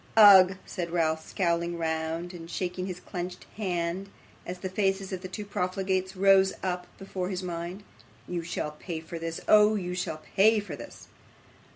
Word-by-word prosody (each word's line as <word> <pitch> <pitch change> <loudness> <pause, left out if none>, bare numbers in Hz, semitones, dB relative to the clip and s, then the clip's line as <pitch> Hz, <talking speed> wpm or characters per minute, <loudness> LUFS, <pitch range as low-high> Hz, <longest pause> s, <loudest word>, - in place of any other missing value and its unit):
'Ugh!' 195 -3 +9
said 175 -2 -4
Ralph, 160 -2 +1
scowling 170 -2 0
round, 165 +2 -2
and 165 -1 -9
shaking 180 +1 -3
his 180 -2 -5
clenched 180 0 -6
hand 185 -1 -2 0.4
as 180 - -4
the 185 - -4
faces 195 0 0
of 185 - -4
the 185 - -5
two 205 +3 -6
profligates 190 -1 -1
rose 190 0 +5
up 180 -1 -2
before 190 -1 -4
his 185 -1 -3
mind; 175 +3 -5 0.4
'you 175 -1 -2
shall 165 -2 -3
pay 160 +2 -6
for 165 +1 -7
this. 165 0 -4
Oh! 215 0 +6
you 180 -3 -3
shall 180 -3 -3 0.2
pay 215 +3 +6
for 195 -7 -6
this! - - -11
180 Hz, 170 wpm, -28 LUFS, 170-195 Hz, 0.4 s, Ugh